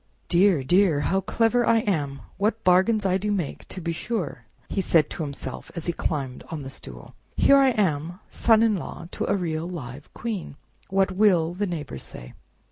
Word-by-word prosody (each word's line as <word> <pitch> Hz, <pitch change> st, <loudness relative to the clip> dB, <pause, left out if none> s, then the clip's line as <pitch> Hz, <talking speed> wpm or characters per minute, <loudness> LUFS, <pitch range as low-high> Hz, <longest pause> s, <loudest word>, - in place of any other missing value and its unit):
"Dear! 175 Hz, -4 st, +4 dB
dear! 175 Hz, 0 st, +3 dB
how 190 Hz, +6 st, +1 dB
clever 235 Hz, +4 st, +2 dB
I 230 Hz, -1 st, +4 dB
am! 145 Hz, -10 st, -2 dB, 0.2 s
What 215 Hz, +3 st, 0 dB
bargains 190 Hz, +4 st, +4 dB
I 190 Hz, 0 st, +2 dB
do 210 Hz, +2 st, -1 dB
make, 180 Hz, -8 st, -3 dB
to 185 Hz, -, -7 dB
be 170 Hz, -1 st, -2 dB
sure!" 185 Hz, -1 st, -4 dB, 0.3 s
said 170 Hz, -5 st, +3 dB
he -, -, -27 dB
to -, -, -6 dB
himself 140 Hz, -3 st, -6 dB
as 170 Hz, -, -5 dB
he 170 Hz, -, 0 dB
climbed 135 Hz, -6 st, -3 dB
on 160 Hz, -, -4 dB
to 145 Hz, -, -7 dB
the 135 Hz, -, -6 dB
stool. -, -, -10 dB, 0.2 s
"Here 280 Hz, -, +6 dB
I 270 Hz, -1 st, +5 dB
am, 175 Hz, -, 0 dB
son 225 Hz, -1 st, +3 dB
in 220 Hz, -3 st, +3 dB
law 170 Hz, 0 st, -7 dB
to -, -, -3 dB
a 200 Hz, -, +3 dB
real 165 Hz, -2 st, -2 dB
live 145 Hz, -5 st, -8 dB
Queen! 215 Hz, -10 st, -4 dB, 0.3 s
What 195 Hz, 0 st, +2 dB
will 185 Hz, -4 st, +3 dB
the 200 Hz, +3 st, -2 dB
neighbors 150 Hz, -, -5 dB
say?" -, -, -10 dB
180 Hz, 195 wpm, -25 LUFS, 155-205 Hz, 0.3 s, Here